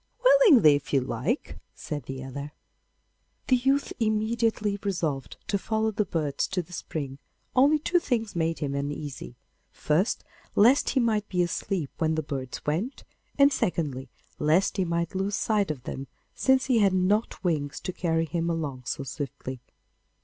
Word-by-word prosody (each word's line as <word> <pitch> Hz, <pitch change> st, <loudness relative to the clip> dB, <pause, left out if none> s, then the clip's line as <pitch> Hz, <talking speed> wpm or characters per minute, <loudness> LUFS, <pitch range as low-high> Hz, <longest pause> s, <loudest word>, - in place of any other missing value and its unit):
'Willingly, 450 Hz, -, +7 dB
if 145 Hz, 0 st, -3 dB
you 140 Hz, -, +5 dB
like,' 130 Hz, -, -2 dB, 0.2 s
said 145 Hz, -5 st, -5 dB
the 135 Hz, 0 st, -5 dB
other. 140 Hz, +3 st, -7 dB, 1.0 s
The 255 Hz, -, +6 dB
youth 270 Hz, +3 st, +1 dB
immediately 220 Hz, -1 st, 0 dB
resolved 160 Hz, -, -2 dB
to 200 Hz, -, 0 dB
follow 220 Hz, +2 st, 0 dB
the 210 Hz, 0 st, 0 dB
birds 150 Hz, -6 st, -1 dB
to 185 Hz, -2 st, -2 dB
the 180 Hz, -, -15 dB
spring, 140 Hz, -5 st, -5 dB, 0.4 s
only 280 Hz, +4 st, +5 dB
two 345 Hz, +4 st, +2 dB
things 225 Hz, -, -2 dB
made 165 Hz, -1 st, 0 dB
him 145 Hz, -3 st, -3 dB
uneasy: 140 Hz, -, -5 dB, 0.3 s
first, 165 Hz, +9 st, 0 dB, 0.3 s
lest 245 Hz, +7 st, +5 dB
he 265 Hz, -, +2 dB
might 215 Hz, -4 st, +1 dB
be 180 Hz, -1 st, +2 dB
asleep 175 Hz, -2 st, -2 dB
when 160 Hz, -1 st, +1 dB
the 155 Hz, -, -1 dB
birds 135 Hz, -3 st, -5 dB
went, 180 Hz, -, -2 dB, 0.3 s
and 280 Hz, 0 st, +6 dB
secondly, 140 Hz, -, -1 dB, 0.3 s
lest 160 Hz, +8 st, +2 dB
he 190 Hz, -, +1 dB
might 170 Hz, +1 st, -1 dB
lose 195 Hz, +2 st, -1 dB
sight 210 Hz, -4 st, +1 dB
of 140 Hz, -5 st, -4 dB
them, 135 Hz, +1 st, -6 dB, 0.3 s
since 265 Hz, -1 st, +3 dB
he 250 Hz, -4 st, +3 dB
had 200 Hz, -3 st, +4 dB
not 195 Hz, +5 st, +1 dB
wings 150 Hz, -5 st, -1 dB
to 185 Hz, -, -4 dB
carry 165 Hz, -2 st, 0 dB
him 170 Hz, +1 st, -2 dB
along 150 Hz, -6 st, -3 dB
so 140 Hz, -, -2 dB
swiftly. 135 Hz, -1 st, -6 dB
175 Hz, 160 wpm, -27 LUFS, 145-220 Hz, 1.0 s, Willingly